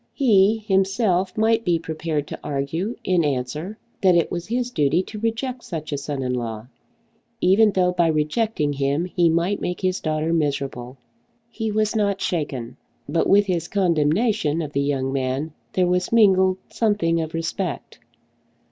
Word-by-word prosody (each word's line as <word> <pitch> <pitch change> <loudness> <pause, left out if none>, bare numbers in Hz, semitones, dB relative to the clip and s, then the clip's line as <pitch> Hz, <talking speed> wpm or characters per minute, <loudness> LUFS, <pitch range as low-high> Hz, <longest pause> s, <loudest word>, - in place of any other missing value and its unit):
He 215 -5 +4
himself 195 -2 +1
might 225 +1 +2
be 175 -4 +2
prepared 160 -2 -3
to - - -7
argue 150 - -2
in 180 -3 +2
answer 150 +8 -3 0.2
that 185 -2 +5
it 170 - +2
was 175 0 -4
his 245 +2 -2
duty 155 - +2
to 210 +2 -8
reject 235 +3 -2
such 155 -3 -6
a 145 - -1
son 140 -1 -4
in 125 0 -1
law, 115 -3 -4 0.7
even 205 +3 +5
though 180 -1 +2
by 175 -2 +2
rejecting 155 +1 0
him 140 +4 0
he 175 -2 +2
might 170 +5 0
make 180 - -3
his 185 0 0
daughter 155 +1 -1
miserable. 140 -5 -2 0.5
He 225 -2 -3
was 215 +1 0
not 200 -2 +1
shaken; 145 -10 -3 0.3
but 170 - 0
with 205 +1 +5
his 175 -3 -1
condemnation 175 -1 +1
of 150 -1 -7
the 140 - +1
young 135 -2 -1
man 135 +3 -2 0.2
there 185 - +2
was 180 +1 0
mingled 190 -4 +4
something 185 -7 +1
of 160 0 -5
respect. 165 +1 -4
175 Hz, 160 wpm, -22 LUFS, 150-200 Hz, 0.7 s, that